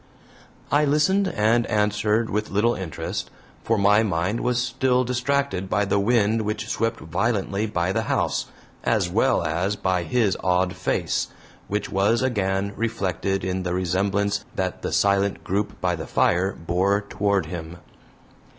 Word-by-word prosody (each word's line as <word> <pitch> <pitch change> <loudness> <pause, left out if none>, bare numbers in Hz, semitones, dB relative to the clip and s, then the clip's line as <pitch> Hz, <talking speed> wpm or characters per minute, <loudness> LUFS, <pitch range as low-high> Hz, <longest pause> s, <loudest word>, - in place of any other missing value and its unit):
I 145 +1 +4
listened 155 +7 +3
and 115 - +2
answered 105 +2 +1
with 105 +1 -1
little 110 +4 +2
interest, 90 -8 -4 0.3
for 115 - +1
my 105 +1 +5
mind 95 +1 0
was 125 0 0
still 125 0 +1
distracted 125 -5 -1
by 105 +1 +1
the 100 +1 +1
wind 110 +1 +2
which 105 0 -3
swept 115 +1 -1
violently 100 +4 -1
by 90 -3 -1
the 110 - 0
house, 110 - -1 0.4
as - - +1
well - - +2
as 90 +6 -1
by 95 -3 0
his 105 +1 +1
odd 90 0 +2
face, - - -1 0.4
which 105 +1 -3
was 105 +5 +2
again 100 -5 0
reflected 95 -4 -1
in 95 0 -1
the 90 -1 -2
resemblance 95 +3 0
that 95 -1 -2
the - - -3
silent 100 0 +2
group 100 +3 -2
by 90 -1 +1
the 80 - -7
fire 90 +3 +2
bore 95 +5 0
toward 100 -2 0
him. 80 +1 -7
100 Hz, 150 wpm, -24 LUFS, 95-115 Hz, 0.4 s, my